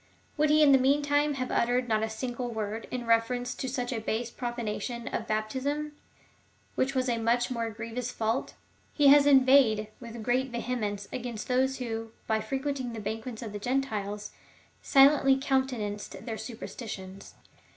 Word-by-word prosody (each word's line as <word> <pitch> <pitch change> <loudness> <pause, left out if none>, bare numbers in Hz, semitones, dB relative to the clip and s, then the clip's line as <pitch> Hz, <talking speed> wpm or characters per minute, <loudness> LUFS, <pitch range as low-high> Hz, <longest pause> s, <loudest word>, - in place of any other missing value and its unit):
Would 300 0 +2
he 305 +1 +5
in 285 - +7
the 270 - +7
meantime 290 +2 +2
have 255 -1 -3
uttered 245 +1 +1
not 220 -2 +1
a 220 - -1
single 245 +2 -4
w^ord 220 -1 -4
in 250 -1 -4
reference 245 +2 +1
to 260 - -4
such 250 -1 -2
a 225 - -3
base 225 +2 -2
profanation 240 0 -4
of 225 - -3
baptism, 265 +8 -2 0.8
which 270 +1 0
w^as 260 0 +1
a 235 -2 0
much 240 +3 +1
more 230 -2 -2
grievous 230 +3 -5
fault? 225 +3 -2 0.4
He 290 -2 +6
has 285 0 +7
inveighed 260 -6 +5
with 235 -2 -8
great 255 +3 +1
vehemence 230 -4 -3
against 240 -3 -5
those 265 +1 +1
who, 225 -2 -5
by 220 -1 +1
frequenting 265 +1 -3
the 225 - -5
banquets 220 +3 -5
of 215 -3 -7
the 205 - -4
Gentiles, 210 -4 -2 0.5
silently 270 -1 +5
counte 265 -1 +2
nanced 205 -1 -6
their 230 -3 -3
superstitions. 195 -5 -8
245 Hz, 160 wpm, -29 LUFS, 220-265 Hz, 0.8 s, in